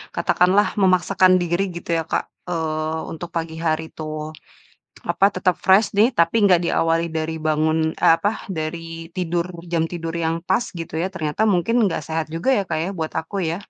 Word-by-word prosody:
katakanlah 185 +3 +3
memaksakan 185 0 +4
diri 175 +2 0
gitu 170 0 -9
ya 165 - -1
Kak, - - -1 0.3
eee, 160 -1 -2
untuk 165 +2 -7
pagi 165 -1 -3
hari 160 0 +1
tuh, 155 -1 -5 0.8
apa, - - +2
tetap 185 -1 +1
fresh 190 +3 +5
nih, 215 +3 +6
tapi 170 +5 +3
enggak 180 -4 +5
diawali 165 0 +1
dari 160 0 -2
bangun 155 +1 +2 0.2
eh - - +7
apa, 205 - +2 0.3
dari 165 +1 -5
tidur 175 -1 -1 0.3
jam 165 -1 +2
tidur 165 -1 -4
yang 165 +1 0
pas 190 +6 +2
gitu 165 - -7
ya, 185 - 0
ternyata 155 +1 -2
mungkin 195 +3 +1 0.2
ga - - -2
sehat 160 +1 -2
juga 165 +10 0
ya 210 - +2
Kak - - -1
ya, - - -3
buat 160 -1 -3
aku 165 +5 -8
ya? 165 - -2
165 Hz, 180 wpm, -22 LUFS, 160-185 Hz, 0.8 s, eh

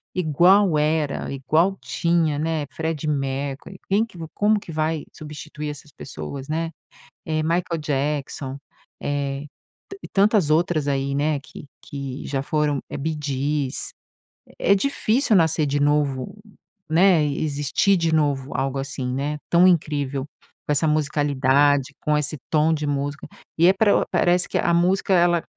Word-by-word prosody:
igual 180 +2 +4
era, 150 -1 0
igual 155 +8 +1
tinha, 165 -4 0
né, 160 -1 -1
Freddie 160 -2 -3
Mercury 140 +4 -3
quem 200 +3 +2
que 225 -6 -10 0.2
como 210 +1 +2
que 175 - -10
vai 155 0 -1
substituir 150 0 -7
essas 145 0 -9
pessoas, 130 - -8
né? 165 +2 -2 0.6
Eh, 155 0 0
Michael 170 +1 0
Jackson, 140 -2 -2 0.5
eh, 140 -1 -2 0.6
e - - -7
ta 195 - +2
tantas 205 -6 +3
outras 155 -1 +2
aí, 140 0 0
né, 145 +1 +1
que 145 - -12 0.2
que 140 -2 -6
já 135 -1 -2
foram. 150 -1 0
Eh, - - -5
Bee 155 +2 -3
Gees. 140 0 -2 0.7
É 200 - +4
difícil 230 +1 +2
nascer 160 -3 +3
de 145 +1 0
novo, 145 0 0 0.5
né, 175 0 +5
existir 145 +6 +1
de 165 -1 +1
novo, 145 -3 0
algo 135 0 -1
assim, 135 -2 -4
né, 145 +3 -2
tão 175 +2 +6
incrível, 145 -5 0 0.4
com - - +1
essa 150 +2 +2
musicalidade, 145 -2 +2
com 150 0 +1
esse 150 +1 -2
tom 155 +1 +3
de 150 -1 -3
música. 145 +1 -3 0.3
E 170 - +5
é - - +7
pra 205 +1 +3
parece 180 0 +2
que - - -3
a 170 - +1
música 185 +3 +2
ela 175 -1 +3
150 Hz, 150 wpm, -23 LUFS, 140-170 Hz, 0.7 s, é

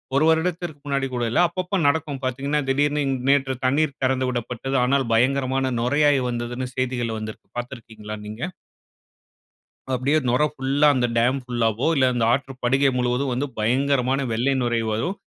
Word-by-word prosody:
1 145 +3 +4
வருடத்திற்கு 160 -1 0
முன்னாடி 140 -1 -1
கூட 120 -1 -1
இல்ல. - - +2
அப்பப்போ 185 +3 -3
நடக்கும் 145 -2 0
பார்த்தீங்கணா, 140 +3 -1
திடீர்னு 145 +2 +1
இன் 135 - 0
நேற்று 135 -1 +3
தண்ணீர் 140 +2 +1
திறந்துவிடப்பட்டது. 130 0 -1
ஆனால் 135 +1 +2
பயங்கரமான 130 +2 +1
நுரையாய் 145 +3 +3
வந்ததுன்னு 120 +1 -3
செய்திகள் 120 -3 -2
வந்திருக்கு. 110 0 -8
பார்த்திருக்கீங்களா 110 -4 -7
நீங்க? 105 +3 -8 1.5
அப்படியே 135 +4 +2
நொரை 140 +5 +3
ஃபுல்லா 140 +2 +2
அந்த 125 -1 +2
டாம் 125 +4 +2
ஃபுல்லாவோ, 120 0 0
இல்ல 130 -1 +4
அந்த 120 -2 +1
ஆற்று 135 +1 -1
படுகை 135 +3 +3
முழுவதும் 125 +2 0
வந்து, 140 +4 -1
பயங்கரமான 130 +3 +1
வெள்ளை 125 +5 +1
நுரை 120 -1 0
வரும். 145 - -2
130 Hz, 145 wpm, -23 LUFS, 120-140 Hz, 1.5 s, 1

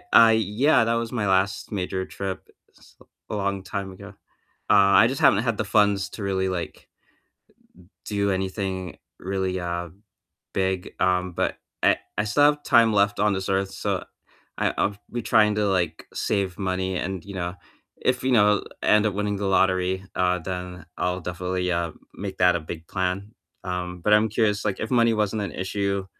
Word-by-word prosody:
I 115 -1 +8
Yeah, 110 +5 +3
that 115 +1 +1
was 115 0 -2
my 110 -5 -1
last 95 +1 +1
major 95 -1 -2
trip 95 -1 -6 0.3
s - - -21 0.3
a 105 - -2
long 100 -1 -1
time 100 -1 -5
ago, 95 - -11 0.6
uh, - - +7
I 100 +3 +6
just 130 +4 -2
haven't 135 -8 +5
had 115 -3 0
the 110 - -1
funds 100 -1 +2
to 110 - -8
really, 95 -1 0
like 90 -2 -5 1.2
do 100 -1 0
anything 95 -1 -3 0.2
really, 95 -1 -2
uh, 85 0 -3 0.7
big, 95 -1 -1
um, 90 0 +1
but - - -1 0.2
I - - +4 0.2
I 105 - +2
still 105 +8 +3
have 145 0 +3
time 115 -4 +5
left 100 0 +2
on 105 0 +3
this 95 0 -3
earth, 95 0 0
so, - - -2 0.5
I - - +1
I'll 100 - +1 0.2
be 120 - -3
trying 105 -1 +4
to, 105 -1 +1
like, 85 -4 -1
save 100 -4 -1
money 95 -1 -1
and, 95 -1 -3
you 100 - -9
know, 90 -1 -3 0.5
if, 125 0 +1
you 130 - +2
know, 105 -3 +4 0.2
end 105 0 +4
up 105 - +1
winning 105 0 -1
the 100 - -4
lottery, 95 -1 +2
uh, 90 0 +2
then 90 -1 -6
I'll 90 +1 -1
definitely, 90 +1 -2
uh, 85 -1 -1 0.2
make 100 -1 -6
that 90 -1 +4
a - - -3
big 80 +1 -8
plan. 95 +2 -2 0.3
Um, 90 -1 -4
but 105 - +2
I'm 105 +1 +4
curious, 105 -1 0
like, 105 -2 -1
if 110 - -3
money 115 -2 +4
wasn't 105 0 0
an 100 - -4
issue 100 0 -2
95 Hz, 180 wpm, -24 LUFS, 90-105 Hz, 1.2 s, I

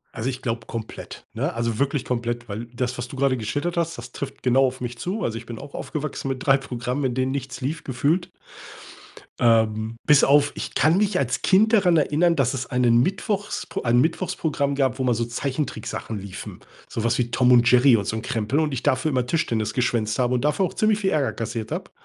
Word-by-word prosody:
Also, 115 +4 -2
ich 130 0 -5
glaube 115 -2 -3
komplett, 115 -1 -7
ne? - - -2
Also, 115 -1 -2
wirklich 140 0 0
komplett, 120 -1 -2
weil 110 +3 -5
das, 125 +1 -3
was 120 0 -5
du 135 - -8
grade 135 -1 +2
geschildert 145 +10 -2
hast, 165 -1 -1
das 120 +1 -9
trifft 140 - -7
genau 130 +1 +4
auf 130 0 -2
mich 120 -1 -5
zu. 195 - -3
Also, 115 -1 -2
ich 115 - -9
bin 115 -1 -7
auch 140 0 -11
aufgewachsen 150 -3 -4
mit 130 -1 -4
3 135 - +7
Programmen, 125 0 -3
in 125 -2 0
denen 130 +1 0
nichts 130 -2 -5
lief 150 +5 -3
gefühlt. 145 +7 0 1.1
Ähm, 110 -1 +2
bis 150 -2 +6
auf 145 +1 +4
ich - - -6
kann 155 +5 +4
mich 205 -2 +2
als 125 -2 -1
Kind 215 +4 +4
daran 185 -6 +5
erinnern, 160 +3 +3
dass 135 -2 +2
es 130 -1 -4
einen 120 -2 +3
Mittwochspro 200 +4 -2
ein 120 0 +3
Mittwochsprogramm 150 -2 0
gab, 130 -2 +1
wo 130 - -2
immer 125 -1 +2
so 115 +1 -1
Zeichentricksachen 120 -3 -4
liefen. 95 -1 -8 0.3
Sowas 115 0 0
wie 120 -1 -1
Tom 125 +1 +3
und 120 -1 +6
Jerry 125 -1 +6
und 100 - -3
so 110 - -2
'n 110 - -3
Krempel 115 +6 -1
und 155 -3 0
ich 130 - -2
dafür 155 +4 +1
immer 125 -2 +1
Tischtennis 115 -7 -1
geschwänzt 115 -3 0
habe 125 0 +2
und 125 - -1
dafür 150 +6 +2
auch - - -5
ziemlich 215 -1 +2
viel 195 -2 +1
Ärger 150 -6 +1
kassiert 115 -1 -4
habe. - - -5
130 Hz, 220 wpm, -23 LUFS, 115-145 Hz, 1.1 s, 3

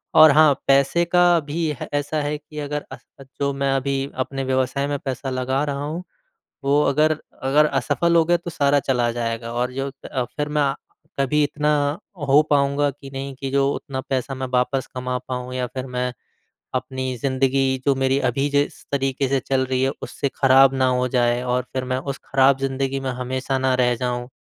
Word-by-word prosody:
और 155 -2 +9
हाँ, 150 0 +6
पैसे 140 +5 +4
का 175 0 +4
भी 160 +2 -2
है - - -4
अ, - - -6
ऐसा 145 +2 -2
है 145 +1 -2
कि 150 0 -10
अगर 150 0 -4
अ, - - -7 0.4
जो 140 0 +1
मैं 135 0 0
अभी 135 0 -1
अपने 135 +1 -3
व्यवसाय 130 +2 0
में 145 0 -1
पैसा 135 0 -4
लगा 130 +2 -1
रहा 140 -1 -3
हूँ, 160 +5 -4 0.6
वो 145 +2 +3
अगर 155 +2 +2 0.2
अगर 145 +3 +4
असफल 170 +4 +1
हो 165 - +5
गए 175 +1 +3
तो 170 0 -7
सारा 145 -3 +2
चला 120 -3 +1
जाएगा। 115 -1 -3
और 125 +1 -1
जो 135 +1 -3 0.2
अ, 130 -2 -1
फिर 150 0 -1
मैं 145 -2 +1 0.5
कभी 150 +2 +2
इतना 150 +1 0 0.6
हो 145 +3 +6
पाऊँगा 140 0 +2
कि 135 0 -12
नहीं 135 0 -5
कि 135 - -3
जो 140 0 +2
उतना 130 -2 -5
पैसा 135 +1 -1
मैं 130 0 -4
वापस 125 +1 +1
कमा 125 0 -2
पाऊँ। 125 0 -4
या 125 -1 -1
फिर 130 +2 -6
मैं 125 0 -2 0.6
अपनी 130 0 -3
ज़िंदगी 135 +1 +1
जो 140 - +4
मेरी 135 0 +1
अभी 135 +4 0
जिस 145 0 0
तरीके 135 -1 0
से 135 - +2
चल 130 0 0
रही 130 0 -1
है 135 - +2
उससे 140 - -3
ख़राब 135 0 +6
ना 130 -1 +2
हो 125 0 +1
जाए 120 -1 +1
और 125 0 0
फिर 130 - -2
मैं 130 - +1
उस 140 +1 -4
ख़राब 135 0 +4
ज़िंदगी 135 0 -1
में 135 - -3
हमेशा 130 +2 -2
ना 130 0 +1
रह 125 -1 +2
जाऊँ। 120 0 -3
135 Hz, 200 wpm, -22 LUFS, 130-145 Hz, 0.6 s, और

